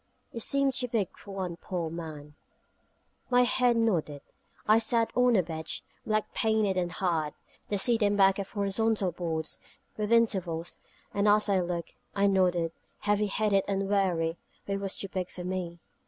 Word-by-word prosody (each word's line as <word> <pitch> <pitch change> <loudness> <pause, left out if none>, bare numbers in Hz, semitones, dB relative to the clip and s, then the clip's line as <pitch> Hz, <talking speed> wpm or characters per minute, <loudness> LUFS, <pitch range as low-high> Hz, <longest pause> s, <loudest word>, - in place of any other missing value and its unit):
It 230 - -5
seemed 275 +3 +2
too 250 -1 -1
big 225 -5 -1
for - - -15
one 180 -3 -3
poor 170 -3 -4
man. 155 -3 -7 1.0
My 250 0 +5
head 245 -1 +3
nodded. 165 -11 0 0.4
I 215 +1 +6
sat 230 0 +1
on 250 -1 +4
a 185 - +4
bench, 160 -1 -5 0.2
black 215 -1 0
painted 220 -3 +2
and 175 -1 0
hard, 165 -5 -1 0.3
the 205 - +1
seat 230 +3 +2
and 205 -1 +3
back 195 0 +5
of 195 - -4
horizontal 205 -1 +1
boards, 160 -3 -3 0.4
with 210 0 -2
intervals; 185 -8 +1 0.3
and 200 +1 +1
as 210 0 +4
I 195 -1 +3
looked, 175 -2 -3 0.2
I 200 0 +3
nodded, 180 -4 +2 0.3
heavy 205 0 +2
headed 200 -1 +2
and 195 -1 0
weary: 175 -5 +1 0.3
for - - -5
it 195 - 0
was 195 -1 -3
too 195 - -3
big 185 -1 -3
for 180 - -8
me. 180 -2 -3
195 Hz, 170 wpm, -29 LUFS, 175-215 Hz, 1.0 s, I